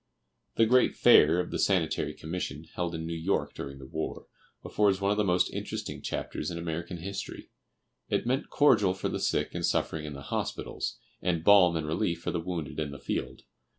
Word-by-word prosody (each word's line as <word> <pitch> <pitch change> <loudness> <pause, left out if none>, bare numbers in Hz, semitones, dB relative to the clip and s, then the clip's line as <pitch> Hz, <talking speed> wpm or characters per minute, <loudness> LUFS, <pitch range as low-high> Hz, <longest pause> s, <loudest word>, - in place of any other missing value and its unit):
The 115 - +5
great 125 +3 +4
fair 80 +4 +6
of 90 - -2
the - - -2
Sanitary 90 -5 +1
Commission, 80 -2 -5
held 85 -1 -2
in 80 0 -4
New 85 - -3
York 80 +4 -1
during 70 0 -7
the 70 - -10
war, 80 +4 -5 0.4
affords 100 -2 +2
one 100 0 +1
of 105 - +1
the 105 - +3
most 90 -2 +2
interesting - - -5
chapters 75 - -3
in 85 - -5
American 85 +1 -4
history. 95 +4 -6 0.6
It - - 0
meant 130 +3 0
cordial 105 -10 +4
for - - -2
the - - -3
sick - - 0
and - - -4
suffering 80 -1 0
in 75 - -6
the 70 0 -8
hospitals, - - -3 0.2
and 85 -3 0
balm 90 -3 +7
and 80 -1 -1
relief 85 +2 -1
for - - -2
the 85 - -1
wounded 85 -4 -4
in 75 -2 -2
the 70 - -8
field. - - -4
85 Hz, 195 wpm, -29 LUFS, 80-95 Hz, 0.6 s, balm